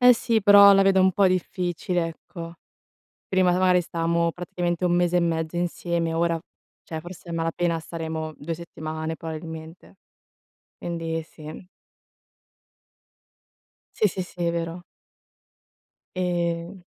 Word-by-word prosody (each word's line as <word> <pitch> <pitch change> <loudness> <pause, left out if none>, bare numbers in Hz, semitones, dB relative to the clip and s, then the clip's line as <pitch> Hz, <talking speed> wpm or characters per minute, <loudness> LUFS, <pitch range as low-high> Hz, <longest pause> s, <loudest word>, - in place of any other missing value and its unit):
Eh, 250 0 +9
sì, 230 -2 +1
però 200 0 +9
la 195 0 +6
vedo 195 -1 +4
un 190 0 +4
po' 195 +2 +4
difficile, 180 -1 -1
ecco. 165 +1 -9 0.7
Prima, 185 -1 +3
magari, 180 -1 +4
stavamo, 170 0 0
praticamente, 175 0 -3
1 175 - +2
mese 175 0 +3
e - - +4
mezzo 165 -1 -1
insieme, 170 -1 -1
ora, 165 0 +1 0.4
cioè, 160 - -5
forse 175 +1 -11
a - - -4
malapena 165 0 0
staremo 160 -1 -5
2 165 +3 -4
settimane, 160 -1 -5
probabilmente. 160 +2 -8 0.8
Quindi, 165 -1 -3
sì. 155 +2 -11 2.3
Sì, 215 - +4
sì, 185 - -3
sì, 175 -1 -5
è 170 - +2
vero. 170 +1 -4 1.3
Ehm. 175 0 -2
170 Hz, 125 wpm, -25 LUFS, 165-180 Hz, 2.3 s, Eh